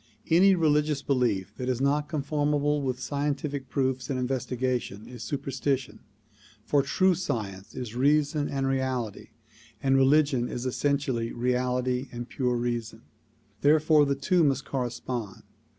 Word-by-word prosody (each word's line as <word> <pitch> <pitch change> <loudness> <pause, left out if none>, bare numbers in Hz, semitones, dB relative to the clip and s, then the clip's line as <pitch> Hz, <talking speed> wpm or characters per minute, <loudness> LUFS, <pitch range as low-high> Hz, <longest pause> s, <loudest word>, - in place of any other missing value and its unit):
Any 190 +4 +6
religious 150 -3 +2
belief 110 -8 0
which 125 -1 -3
is 125 -1 0
not 145 +2 +1
con 155 -4 -2
formable 145 0 +1
with 130 -2 -2
scientific 140 -1 -3
proof 130 -1 -1
and 135 - -1
investigation 125 -4 -2
is 125 -2 -10
superstition, 135 0 -2 0.7
for 145 +2 +3
true 185 +7 +2
science 105 - -4
is 125 -4 -5
reason 145 +3 +2
and 135 -1 -1
reality, 130 -5 -2 0.5
and 135 0 +2
religion 135 -2 +3
is 120 - -4
essentially 130 -3 0
reality 125 +1 0
and 120 -1 -6
pure 125 -2 -1
reason; 120 -2 -3 0.6
therefore 150 +1 +5
the 140 - +1
two 170 +6 +2
must 135 -2 +1
correspond. 120 -4 -4
135 Hz, 135 wpm, -27 LUFS, 125-145 Hz, 0.7 s, Any